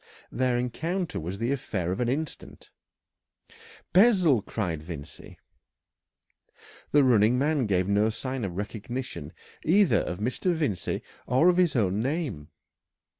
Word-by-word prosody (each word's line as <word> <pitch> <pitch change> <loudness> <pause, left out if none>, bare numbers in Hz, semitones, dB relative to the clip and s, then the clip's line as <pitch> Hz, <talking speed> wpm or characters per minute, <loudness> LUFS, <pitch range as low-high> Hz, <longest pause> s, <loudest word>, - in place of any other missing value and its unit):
Their 125 -1 +1
encounter 165 +9 -2
was 90 +5 -5
the 115 +4 -1
affair 95 -10 -2
of 95 - -3
an 120 -1 +1
instant. 150 +4 -5 1.2
"Bessel!" 185 - +5
cried 90 -8 -3
Vincey. 80 -2 -9 1.5
The 145 -1 +4
running 120 -1 +4
man 145 -2 +1
gave 95 -2 +1
no 105 +2 +3
sign 130 +2 -4
of 90 -3 -4
recognition 110 - -5 0.3
either 170 - +4
of 90 - -3
Mr. 125 - -1
Vincey 125 - -2 0.2
or 130 +8 +4
of 180 - +2
his 175 -6 +3
own 100 -3 +1
name. 130 - -3
120 Hz, 125 wpm, -27 LUFS, 100-150 Hz, 1.5 s, Bessel